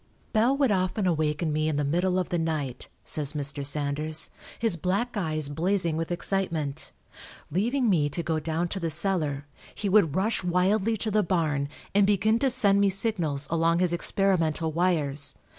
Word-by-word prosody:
"Bell 240 +5 +3
would 275 -5 +2
often 185 +1 0
awaken 155 -2 0
me 155 +1 0
in 155 - -1
the 145 - 0
middle 175 +6 0
of 185 - -1
the 175 - -1
night," 150 -6 -3 0.2
says 150 -1 +2
Mr. 145 -1 -1
Sanders, 150 +2 0 0.3
"his 225 -6 0
black 195 +9 -2
eyes 155 -6 -1
blazing 170 +3 0
with 165 +2 -3
excitement. 170 -5 -1 0.6
Leaving 240 - 0
me 160 -8 +2
to 170 +4 -3
go 160 -2 -1
down 160 +2 -2
to 195 - -4
the 165 -2 -2
cellar, 155 -4 0 0.3
he 205 - -3
would 185 -7 +3
rush 200 +2 0
wildly 190 +5 +1
to 215 +1 -3
the 215 +1 +3
barn 155 -6 -1 0.2
and 200 0 +4
begin 210 +3 +2
to 270 - +2
send 205 -6 +3
me 200 - +4
signals 180 -8 0
along 165 0 +2
his 180 -1 +1
experimental 170 -3 0
wires. 155 -5 0
170 Hz, 175 wpm, -26 LUFS, 155-195 Hz, 0.6 s, and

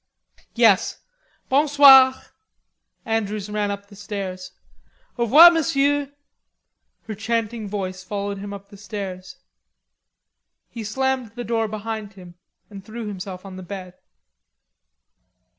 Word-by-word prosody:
"Yes. 225 -5 +3 0.5
Bon 285 +3 +2
soir." 270 -2 +8 0.9
Andrews 215 -2 -2
ran 210 -1 -1
up 200 0 -5
the 200 - -16
stairs. 190 -3 -6 0.7
"Au 235 - 0
revoir, 315 +9 +9
Monsieur." 285 -3 0 0.9
Her 220 - -7
chanting 220 0 -3
voice 185 -2 -5
followed 200 0 -4
him 200 0 -7
up 200 0 -10
the 200 - -14
stairs. 195 -3 -7 1.4
He 230 -1 -7
slammed 255 0 -2
the 245 - -5
door 225 -1 -1
behind 215 0 -6
him 180 -3 -13 0.3
and 200 -2 -11
threw 225 +2 -8
himself 190 -2 -7
on 190 -1 -9
the - - -8
bed. 185 0 -8
210 Hz, 120 wpm, -22 LUFS, 195-235 Hz, 1.4 s, revoir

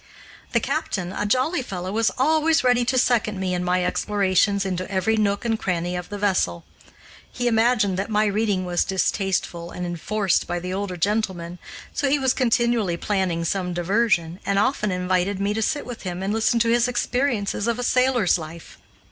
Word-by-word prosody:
The - - +4
captain, 185 -1 -2
a 205 - -2
jolly 260 - +1
fellow, 185 -6 -5
was 225 +2 +2
always 315 +3 +3
ready 245 -1 +3
to 255 +2 +1
second 220 -5 +2
me 185 -1 -1
in 180 0 -1
my 180 0 +1
explorations 200 0 +1
into 185 -1 -3
every 200 +3 +1
nook 205 0 0
and 225 -1 0
cranny 175 -1 -2
of 180 0 -5
the 205 - -5
vessel. 185 - 0 0.7
He 245 -1 -2
imagined 225 -4 +2
that 195 +3 -2
my 215 0 +2
reading 205 -2 0
was 175 -1 +1
distasteful 190 -3 -1
and 180 - -5
enforced 185 +3 0
by 175 - -2
the 180 +1 -5
older 190 -2 -3
gentlemen, 180 -3 -1 0.3
so 280 - 0
he 290 - +3
was 265 -2 +2
continually 235 -7 +1
planning 185 -4 -1
some 180 0 -2
diversion, 175 -2 +1
and 200 0 0
often 210 -2 +1
invited 185 +1 0
me 200 +1 0
to 220 - -2
sit 290 +6 -1
with 245 -2 -8
him 180 0 -5
and 200 +2 -1
listen 220 +1 +2
to 230 - +2
his 240 +1 +3
experiences 245 -4 -1
of 235 0 0
a 245 - -3
sailor's 250 -7 +2
life. 160 +1 -10
200 Hz, 185 wpm, -23 LUFS, 180-235 Hz, 0.7 s, The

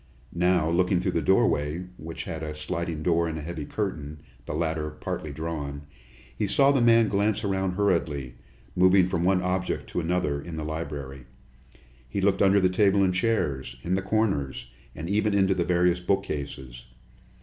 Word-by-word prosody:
Now, 90 -2 +2
looking 90 +2 +2
through - - -1
the - - 0
doorway, 75 +5 +2
which 80 +1 -6
had 80 -1 -6
a 75 -1 -5
sliding 80 0 -3
door 85 0 +2
and 80 -1 -4
a 75 - -6
heavy 80 -2 -5
curtain, 75 -8 -4 0.3
the - - -3
latter 80 -1 -1
partly 75 0 -5
drawn, 75 -2 -5 0.5
he 105 - -1
saw 140 +7 +4
the 135 -3 +2
man 115 -1 +5
glance 105 +2 0
around 95 -2 0
hurriedly, 80 -10 0 0.4
moving 95 +1 +5
from 85 -2 -1
one 90 0 +2
object 90 0 -1
to - - -1
another 80 -4 -1
in 85 +1 -7
the 80 - -4
library. 70 -4 -6 0.8
He 100 - -2
looked 95 0 +2
under 100 0 +5
the 95 - +4
table 100 +1 +3
and 95 -1 +2
the - - -1
chairs, 70 - -1
in 90 - -1
the 95 - +1
corners, 95 - -1 0.2
and 80 - -6
even 105 +1 +1
into 95 -1 +3
the 90 -2 -1
various 90 0 +2
bookcases. 70 -10 -3
85 Hz, 175 wpm, -26 LUFS, 75-95 Hz, 0.8 s, man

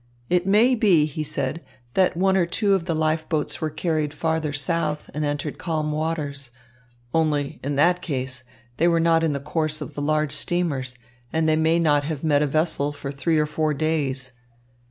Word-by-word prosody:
"It 180 +1 +2
may 220 +6 +5
be," 195 -10 +4
he 155 +1 -4
said, 150 +1 -2 0.3
"that 185 -3 +2
one 190 +1 +3
or 180 -3 +2
two 200 +3 +1
of 190 -3 +1
the 165 -2 -1
life 155 0 0
boats 155 -4 -1
were 155 - 0
carried 155 -1 -1
farther 160 0 -1
south 150 +1 -2
and 150 - -2
entered 145 0 -3
calm 155 -3 -1
waters. 150 -4 -2 0.6
Only, 150 -3 0
in 140 +1 -2
that 175 +5 +3
case, 130 -5 -3 0.3
they 170 - +3
were 170 -1 +3
not 165 0 +3
in 160 -2 +1
the 140 - -2
course 155 +2 -1
of - - -7
the 145 - -5
large 155 0 +1
steamers, 140 -9 -1 0.3
and 160 0 +1
they 155 - +4
may 160 +1 +3
not 150 -4 +3
have 155 -1 -4
met 145 -2 +3
a 150 - +2
vessel 145 -1 0
for 140 -1 -6
three 145 +4 0
or 150 - +3
four 150 0 -1
days. 140 -4 -1
155 Hz, 195 wpm, -24 LUFS, 145-165 Hz, 0.6 s, may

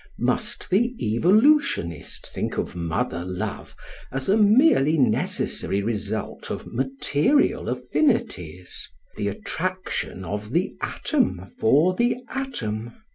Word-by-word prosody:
Must - - -1
the 240 +6 +2 0.2
evolutionist 200 - +2
think - - -3
of - - -3
mother 85 +3 -2
love 95 +3 -5 0.4
as 135 +3 -3
a 200 - +5
merely 210 - +5
necessary 100 -6 0
result 110 -1 -3
of - - -4
material 135 - +1
affinities, 90 - -1
— - - -37
the 105 - -1
attrac 185 - -3
tion 95 - -3
of 105 +4 -5
the 180 +3 0
atom 245 - 0
for 150 +11 +4
the 240 +6 +2
atom 120 - -4
135 Hz, 115 wpm, -24 LUFS, -, 0.4 s, a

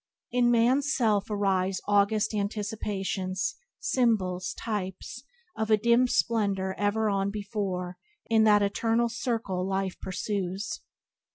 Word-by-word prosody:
"In 245 0 +3
man's 250 +5 +3
self 215 -4 +1
arise 195 -2 0
August 205 +2 +2
anticipations; 200 -2 -2 0.2
symbols, 190 -7 0
types 190 -4 -5 0.3
Of 220 0 -2
a 215 - +5
dim 235 +3 +4
splendor 200 -6 0
ever 210 +2 +1
on 200 -1 +1
before 195 -4 -3 0.3
In 225 -1 +3
that 210 -1 +5
eternal 225 +3 +1
circle 225 -6 -2
life 190 0 -2
pursues." 195 - -3
205 Hz, 110 wpm, -28 LUFS, 190-225 Hz, 0.3 s, a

